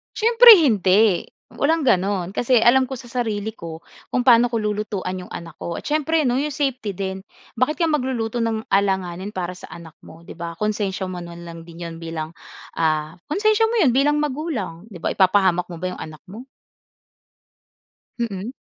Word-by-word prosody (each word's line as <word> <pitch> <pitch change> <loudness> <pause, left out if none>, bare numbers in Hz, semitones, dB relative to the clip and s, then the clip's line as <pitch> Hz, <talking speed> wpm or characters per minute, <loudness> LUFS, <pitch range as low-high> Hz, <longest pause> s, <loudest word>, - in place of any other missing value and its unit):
Siyempre 465 +2 +6
hindi. 210 - +3 0.2
Walang 320 +1 0
gano'n, 190 -4 +1
kasi 245 +3 +2
alam 250 +3 +4
ko 265 - -4
sa 245 - -12
sarili 220 -3 -2
ko 165 -5 -8 0.3
kung 250 -1 -1
paano 240 -1 +6
ko 235 - -1
lulutuan 210 -3 -3
'yong - - -13
anak 165 -2 -8
ko, 170 - -4
at - - -9
siyempre 310 +1 +1
'no 250 +1 +1
'yong 300 +1 -2
safety 260 -7 -1
din. 190 0 -4 0.3
Bakit 255 +6 0
ka 340 - +2
magluluto 255 -6 -1
ng 225 -1 -2
alanganin 190 -1 0
para 180 -1 -3
sa 180 - -12
anak 165 -2 -11
mo 165 +1 -15
'di - - -9
ba, 170 0 -7
konsensiya 205 -2 -2
mo 185 -1 -6
na 170 0 -9
lang 170 -1 -9
din 170 +1 -11
'yon 165 -1 -7
bilang 165 -1 -5 0.4
ah, 155 -1 0 0.2
konsensiya 430 +6 +2
mo 470 - -2
'yon 295 - +4
bilang 290 +3 +3
magulang, 260 - -3
'di 195 - -10
ba? - - 0
Ipapahamak 185 -2 +3
mo 170 - -7
ba 175 - -6
'yong - - -9
anak 155 -1 -9
mo? 215 +7 -11 1.7
Mm. 215 -1 -3
210 Hz, 180 wpm, -22 LUFS, 175-260 Hz, 1.7 s, Siyempre